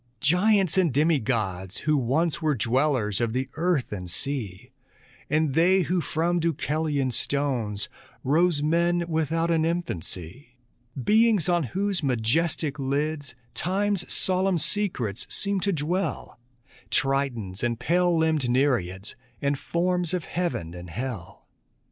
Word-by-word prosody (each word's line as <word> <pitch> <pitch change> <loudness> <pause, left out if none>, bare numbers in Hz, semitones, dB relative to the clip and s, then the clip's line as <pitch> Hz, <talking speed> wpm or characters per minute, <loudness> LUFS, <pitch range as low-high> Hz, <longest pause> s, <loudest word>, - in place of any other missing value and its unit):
Giants 190 +3 +3
and 175 -5 +3
demi 150 +3 +3
gods 95 -4 -2
who 150 0 +2
once 145 +6 +1
Were 155 -2 +1
dwellers 120 -3 +1
of 115 -2 0
the 130 +1 -2
earth 165 -4 0
and 90 -3 -5
sea, 120 - -3 0.6
And 155 -1 +1
they 180 +5 +4
who 175 +3 0
from 170 +3 0
Deucalion's 150 -4 0
stones, 125 -8 0 0.4
Rose 155 +2 +2
men 170 +2 +2
without 165 +1 0
an 160 -1 +2
infancy; 120 - -4 0.4
Beings 215 - +3
on 175 -1 +3
whose 195 - -1
majestic 140 +4 0
lids 145 +1 -2 0.2
Time's 195 +1 -1
solemn 185 0 +1
secrets 145 - -1
seemed 200 -1 -1
to 200 +2 +1
dwell, 165 - -2 0.5
Tritons 130 -9 -1
and 120 -1 0
pale 175 +6 +2
limbed 160 -5 +1
Nereids, 110 -8 0 0.2
And 140 -1 0
forms 180 0 0
of 175 - -3
heaven 165 - -3
and 90 0 -9
hell. 115 -2 -6
150 Hz, 125 wpm, -26 LUFS, 125-175 Hz, 0.6 s, they